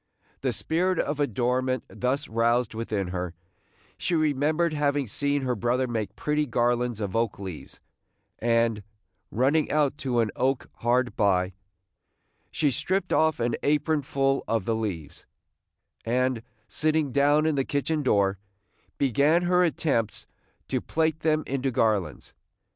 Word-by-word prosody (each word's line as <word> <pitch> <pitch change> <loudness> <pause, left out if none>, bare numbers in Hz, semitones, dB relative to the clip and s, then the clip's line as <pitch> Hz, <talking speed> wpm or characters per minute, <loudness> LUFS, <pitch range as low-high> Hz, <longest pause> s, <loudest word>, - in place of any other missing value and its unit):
The - - 0
spirit 180 +3 0
of 145 -1 -1
adornment 130 0 0
thus 135 +4 -2
roused 115 +1 +1
within 110 -4 -2
her, 90 -1 -4 0.6
she 180 - 0
remembered 155 +2 +1
having 145 -1 +1
seen 140 +5 -1
her 125 -1 0
brother 120 +4 0
make 110 -4 -3
pretty 150 0 0
garlands 120 -1 0
of 100 -1 -3
oak 115 -2 0
leaves; 95 -6 -8 0.6
and, 115 -2 +2 0.5
running 140 +7 +2
out 145 -1 +1
to 125 -3 0
an 115 -2 +1
oak 135 0 -1
hard 120 -1 +1
by, 95 -3 +2 1.0
she 145 -3 +1
stripped 175 +7 -1
off 160 -1 +3
an 120 0 0
apronful 140 -2 +1
of 115 -4 0
the 115 - +1
leaves, 95 -10 -5 0.8
and, 125 0 0 0.3
sitting 155 -2 0
down 145 +3 +3
in 160 - +2
the 135 -2 +1
kitchen 150 +3 -1
door, 100 -7 +2 0.6
began 145 +6 +3
her 180 +1 +3
attempts 145 - 0 0.4
to - - -1
plait 160 0 0
them 155 -1 +1
into 135 0 -1
garlands. 105 - 0
130 Hz, 135 wpm, -26 LUFS, 115-150 Hz, 1.0 s, off